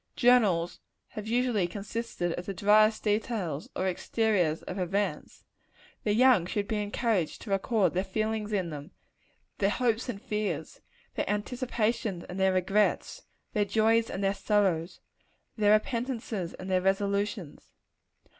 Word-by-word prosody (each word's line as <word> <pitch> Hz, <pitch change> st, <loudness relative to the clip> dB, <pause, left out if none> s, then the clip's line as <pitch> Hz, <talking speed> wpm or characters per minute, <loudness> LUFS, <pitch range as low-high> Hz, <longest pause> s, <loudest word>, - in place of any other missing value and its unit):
Journals 210 Hz, -9 st, +3 dB, 0.3 s
have 215 Hz, 0 st, -7 dB
usually 235 Hz, -5 st, +1 dB
consisted 200 Hz, -2 st, -3 dB
of 175 Hz, -, -6 dB
the 195 Hz, -, -4 dB
driest 215 Hz, +3 st, +4 dB
details, 205 Hz, -, -1 dB
or 190 Hz, -, 0 dB
exteriors 185 Hz, -4 st, 0 dB
of 185 Hz, -, -5 dB
events. 195 Hz, +3 st, -2 dB, 0.6 s
The 210 Hz, -1 st, +1 dB
young 240 Hz, -7 st, +5 dB
should 200 Hz, +1 st, -2 dB
be 215 Hz, -2 st, -1 dB
encouraged 205 Hz, -5 st, -1 dB
to 205 Hz, -, -7 dB
record 195 Hz, -1 st, +2 dB
their 185 Hz, +1 st, 0 dB
feelings 215 Hz, +2 st, -2 dB
in 185 Hz, -5 st, -1 dB
them; 145 Hz, +2 st, -7 dB, 0.7 s
their 195 Hz, -, +3 dB
hopes 235 Hz, +1 st, 0 dB
and 210 Hz, -5 st, -4 dB
fears 210 Hz, 0 st, -3 dB, 0.3 s
their -, -, -2 dB
anticipations 215 Hz, -3 st, -1 dB
and 180 Hz, +2 st, -7 dB
their 190 Hz, 0 st, +3 dB
regrets 195 Hz, +3 st, +1 dB, 0.3 s
their 210 Hz, -, +2 dB
joys 225 Hz, +2 st, +2 dB
and 195 Hz, -, -4 dB
their 195 Hz, 0 st, +2 dB
sorrows 195 Hz, -4 st, 0 dB, 0.5 s
their 210 Hz, -2 st, +4 dB
repentances 230 Hz, -5 st, -1 dB
and 185 Hz, -, -8 dB
their 185 Hz, -1 st, +2 dB
resolutions. 200 Hz, -2 st, -1 dB
205 Hz, 135 wpm, -29 LUFS, 185-220 Hz, 0.7 s, young